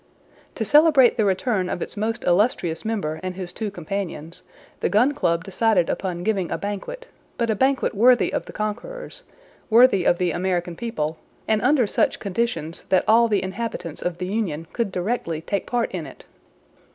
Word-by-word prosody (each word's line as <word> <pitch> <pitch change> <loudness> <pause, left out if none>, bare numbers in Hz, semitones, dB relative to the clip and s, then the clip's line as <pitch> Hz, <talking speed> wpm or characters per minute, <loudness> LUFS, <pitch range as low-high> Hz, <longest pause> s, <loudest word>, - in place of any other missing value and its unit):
To 220 - -2
celebrate 295 0 +6
the 220 - +1
return 190 -1 0
of - - -3
its - - -5
most 220 +2 -2
illustrious 175 -3 +1
member 195 -9 -2
and 185 -1 -4
his 180 -2 -6
two 220 -2 -3
companions, 175 -3 -5 0.4
the - - 0
Gun 240 +7 +4
Club 170 -10 0
decided 195 -2 +1
upon 175 -2 -3
giving 195 -4 0
a - - -2
banquet, 205 - -5 0.3
but 230 -1 +1
a - - 0
banquet 265 +4 +1
worthy 240 +4 +4
of - - -2
the - - -8
conquerors, - - -5 0.4
worthy 230 -4 +6
of 175 - +3
the 180 -1 0
American 175 0 -1
people, 160 -8 -3 0.3
and 215 -1 +2
under 260 -1 +3
such - - 0
conditions 200 -5 -2
that 185 - +3
all 230 +2 +5
the 210 -3 +1
inhabitants 190 -5 -5
of 175 -1 -2
the 180 - -4
Union 180 -6 -2
could 230 -5 -1
directly 180 -4 -2
take 200 +5 -3
part 240 -1 -1
in 175 -4 -5
it. - - -14
200 Hz, 175 wpm, -23 LUFS, 175-235 Hz, 0.4 s, celebrate